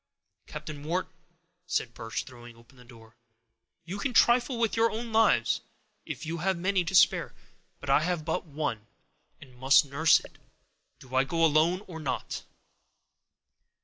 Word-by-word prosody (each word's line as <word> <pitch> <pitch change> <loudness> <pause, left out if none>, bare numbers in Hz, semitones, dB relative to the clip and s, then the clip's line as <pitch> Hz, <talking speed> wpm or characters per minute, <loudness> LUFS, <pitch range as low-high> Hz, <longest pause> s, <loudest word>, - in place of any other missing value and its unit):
"Captain 145 -2 -8
Wharton," 175 +4 -2 0.5
said 125 -9 -2
Birch, 115 0 -5
throwing 120 -2 -13
open 115 +3 -21
the 125 - -16
door, 115 -2 -17 0.7
"you 190 +4 -6
can 250 +1 -3
trifle 245 +1 +4
with 230 -2 0
your 230 0 +3
own 225 +1 -6
lives, 225 0 +3 0.5
if - - -6
you 165 +2 -4
have 190 +2 0
many 185 +1 +1
to 175 +3 -3
spare; - - +4 0.5
I 140 - +4
have 165 0 -2
but 160 - -1
one, 140 -8 -4 0.5
and 130 -3 -15
must 135 +3 +4
nurse 140 +3 +4
it. - - -16 0.6
Do 130 -1 -16
I 130 +1 +4
go 165 +5 +1
alone, 160 +4 +3
or 165 -3 -9
not?" 135 -5 -4
155 Hz, 150 wpm, -28 LUFS, 130-185 Hz, 0.7 s, trifle